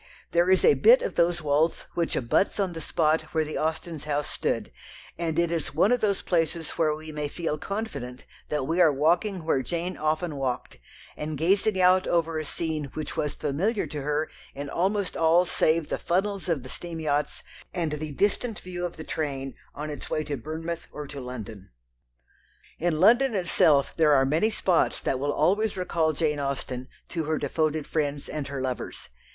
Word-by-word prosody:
There 175 +2 +3
is 190 - +5
a 460 - +7
bit - - +6
of - - -2
those 170 -1 +2
walls 150 +3 +1
which 170 -1 0
abuts 130 - +1
on 190 -3 0
the 165 - -6
spot 155 0 +2
where 160 -1 +2
the 155 - -4
Austens' 160 -1 -2
house 145 -1 -1
stood, 65 - -2 0.4
and 165 -2 -2
it 170 0 +2
is 165 -4 -2
one 190 +8 +4
of 245 - +2
the 200 -3 +2
places 165 -2 0
where 155 -2 +1
we 155 0 -9
may 150 -1 -3
feel 155 0 -3
confident 145 - -5 0.2
that 150 -3 -1
we 165 +5 +2
are 160 -3 +7
walking 170 +6 +1
where 155 -4 +2
Jane 170 +7 -3
often 155 0 -1
walked, 130 - -3 0.4
and 150 0 -4
gazing 190 +5 +2
out 185 0 +5
over 165 -2 +1
a 155 - -4
scene 155 -2 -3
which 155 - -4
was 150 - -1
familiar 195 - 0
to 150 - -5
her 150 +2 0 0.3
in 140 0 -5
almost 195 +2 0
all 165 +2 +4
save 160 -2 +1
the - - -2
funnels 195 +1 -1
of 155 -7 0
the - - -9
steam 170 -2 -5
yachts 150 -2 -1 0.3
and 170 -4 -1
the 150 0 -4
distant 210 - 0
view 180 -1 -4
of 175 - -13
the 160 - -6
train 135 -4 -3 0.2
on 150 +1 -4
its 145 - -7
way 155 - 0
to 145 -1 -3
Bournemouth 160 +5 -5
or 150 - -6
to 140 -1 -7
London. 110 -6 -8 1.1
In 165 -2 0
London 240 +6 +5
itself 160 -6 +3
there 155 -3 +5
are 135 -1 +5
many 160 +10 +2
spots 185 -5 +1
that 130 - -1
will 145 +2 0
always 200 +8 +2
recall 170 -3 +1
Jane 150 -1 0
Austen 130 -2 -3 0.2
to 165 -3 -2
her 155 0 0
devoted 155 +1 0
friends 145 -2 -2
and 150 -3 -4
her 140 -2 -4
lovers. 130 -1 -4
160 Hz, 190 wpm, -27 LUFS, 145-175 Hz, 1.1 s, a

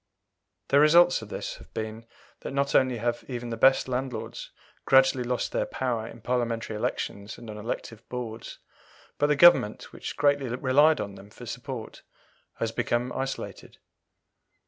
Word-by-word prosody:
The 140 - +5
result 170 +2 +6
of 110 - -10
this - - -5
has - - -15
been, 110 +1 -5 0.3
that - - -6
not 140 0 0
only 130 -2 +3
have 120 +1 -2
even 120 -2 -5
the - - -2
best 130 +4 +4
landlords 130 0 -4 0.3
gradually 130 -1 +4
lost 125 0 -2
their - - -1
power 120 -4 -2
in 115 - -11
Parliamentary 115 -2 -1
elections 105 0 -3
and 115 -2 -9
on 105 - -8
elective 115 +1 -6
boards, 115 -2 -6 0.6
but 145 - +3
the 150 - +3
Government, 145 -9 +5
which - - -7
greatly 145 -2 +2
relied 140 +5 +3
on 100 - -4
them 100 +1 -13
for - - -12
support, - - -7 0.5
has 115 - -2
become 120 +2 -1
isolated. 135 0 -5
125 Hz, 155 wpm, -27 LUFS, 115-135 Hz, 0.6 s, result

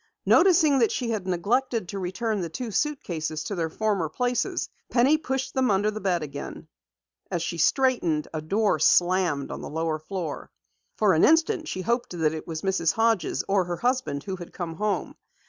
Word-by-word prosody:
Noticing 325 -6 +5
that 230 - +3
she 240 -3 -2
had 205 -4 -3
neglected 220 +3 0
to 200 - -4
return 195 +3 -2
the 170 - -3
two 240 +6 -5
suitcases 170 - -2
to 165 - -4
their 165 -4 -1
former 200 -4 -1
places, 245 +8 -1 0.2
Penny 260 +5 +4
pushed 265 -2 -3
them 260 -1 +2
under 205 +1 +2
the 215 0 -6
bed 180 -4 0
again. 145 -1 -7 0.6
As 170 - -2
she 170 - -4
straightened, 180 - +2
a 155 - -3
door 200 +7 +1
slammed 175 -6 +3
on - - -6
the - - -6
lower 160 0 -2
floor. 160 -1 -5 0.5
For 210 -3 +4
an 160 - +3
instant 325 +2 +3
she 185 - -3
hoped 235 -1 -1
that 155 -2 +1
it 155 - -7
was 160 -2 -5
Mrs. 190 -4 +1
Hodges 225 -3 +1
or 195 -2 +2
her 175 -1 -3
husband 245 - -1
who 190 -1 -4
had 175 -1 -10
come 170 -3 -4
home. 210 0 -1
195 Hz, 185 wpm, -26 LUFS, 170-245 Hz, 0.6 s, Noticing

